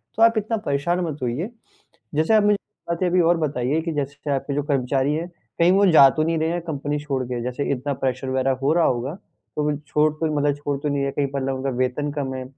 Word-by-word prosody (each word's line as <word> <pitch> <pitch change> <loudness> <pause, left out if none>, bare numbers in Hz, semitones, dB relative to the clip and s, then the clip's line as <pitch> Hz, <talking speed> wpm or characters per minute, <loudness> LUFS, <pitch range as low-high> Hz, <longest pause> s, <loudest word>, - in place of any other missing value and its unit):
तो 225 - -2
आप 230 0 +5
इतना 220 +2 0
परेशान 170 -1 -1
मत 155 -3 -4
होइए। 125 - -2 0.7
जैसे 160 +8 +2
आप 215 -1 +5
मुझे 205 0 +4 0.3
बातें 170 +2 0
अभी 180 +1 +3
और 170 +1 +3
बताइए 145 -1 0
कि 165 +1 -3
जैसे 145 0 -3
आपके 140 +1 -2
जो 145 +1 -1
कर्मचारी 135 0 0
हैं, 165 +3 -2 0.3
कहीं 170 +1 +5
वो 200 +2 +4
जा 140 -4 +8
तो 155 +3 0
नहीं 165 +1 0
रहे 160 +1 +1
हैं 175 +1 -2
कंपनी 150 -2 -3
छोड़ 140 -3 -2
के? 120 -1 -4
जैसे 125 +3 -3
इतना 140 +2 -2
प्रेशर 130 0 -2
वगैरह 130 0 +1
हो 140 +3 +2
रहा 170 0 +3
होगा, 125 +3 0
तो 150 -5 -8
वो 145 - -1
छोड़ 150 +1 +2
तो 155 0 -2
मतलब 145 0 +2
छोड़ 145 -1 -3
तो 150 - -2
नहीं 140 -1 0
रहे 140 - -1
कहीं 140 0 0
मतलब 135 -1 -1
उनका 135 +1 -2
वेतन 130 +3 -1
कम 140 -2 -3
है? 130 - -4
145 Hz, 245 wpm, -23 LUFS, 135-165 Hz, 0.7 s, जा